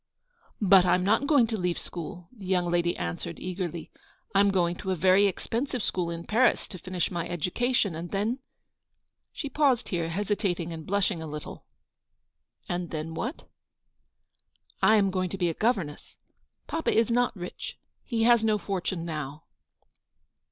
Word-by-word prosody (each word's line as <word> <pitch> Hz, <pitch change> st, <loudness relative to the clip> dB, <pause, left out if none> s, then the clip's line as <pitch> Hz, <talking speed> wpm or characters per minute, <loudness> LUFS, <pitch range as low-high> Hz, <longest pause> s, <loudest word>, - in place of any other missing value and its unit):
" 475 Hz, -, -35 dB
But 195 Hz, -3 st, +7 dB
I'm 180 Hz, 0 st, +3 dB
not 220 Hz, +8 st, +2 dB
going 280 Hz, -6 st, +5 dB
to 225 Hz, -2 st, -3 dB
leave 180 Hz, -1 st, 0 dB
school/' 170 Hz, 0 st, -7 dB
the 200 Hz, -5 st, -9 dB
young 180 Hz, -2 st, +1 dB
lady 175 Hz, 0 st, +1 dB
answered, 85 Hz, 0 st, -4 dB
eagerly. 180 Hz, -2 st, -4 dB, 0.2 s
" -, -, -35 dB
I 195 Hz, -, +4 dB
am 200 Hz, 0 st, +5 dB
going 175 Hz, -3 st, +2 dB
to 190 Hz, -, -5 dB
a 185 Hz, -, +2 dB
very 190 Hz, +3 st, +5 dB
expensive 235 Hz, +5 st, -2 dB
school 175 Hz, -2 st, 0 dB
in 170 Hz, 0 st, -5 dB
Paris, 240 Hz, +4 st, +3 dB
to 185 Hz, -, -8 dB
finish 185 Hz, +1 st, -2 dB
my 170 Hz, -2 st, -3 dB
education; 195 Hz, -, 0 dB
and 165 Hz, +2 st, -5 dB
then 215 Hz, +6 st, -1 dB, 0.3 s
— -, -, -54 dB
" -, -, -53 dB
She 290 Hz, -, -3 dB
paused 275 Hz, -4 st, +2 dB
here, 170 Hz, -3 st, -1 dB
hesitating 185 Hz, -2 st, -1 dB
and 160 Hz, -1 st, -8 dB
blushing 200 Hz, -3 st, +1 dB
a 160 Hz, -, -5 dB
little. 150 Hz, 0 st, -7 dB, 1.0 s
"And 175 Hz, -1 st, -2 dB
then 160 Hz, +1 st, -4 dB
what?" 250 Hz, -, -4 dB
u -, -, -23 dB, 1.4 s
I 220 Hz, -, +6 dB
am 200 Hz, -2 st, +3 dB
going 185 Hz, -1 st, -1 dB
to 195 Hz, -, -5 dB
be 175 Hz, -2 st, +1 dB
a -, -, -1 dB
governess. 190 Hz, -8 st, -1 dB, 0.5 s
Papa 325 Hz, -, -1 dB
is 225 Hz, +1 st, +3 dB
not 245 Hz, 0 st, +2 dB
rich. 180 Hz, -2 st, -7 dB, 0.3 s
He 230 Hz, -3 st, 0 dB
has 235 Hz, -1 st, +5 dB
no 215 Hz, -1 st, +3 dB
fortune 190 Hz, -4 st, -3 dB
now." 150 Hz, -2 st, -5 dB
185 Hz, 175 wpm, -28 LUFS, 170-220 Hz, 1.4 s, But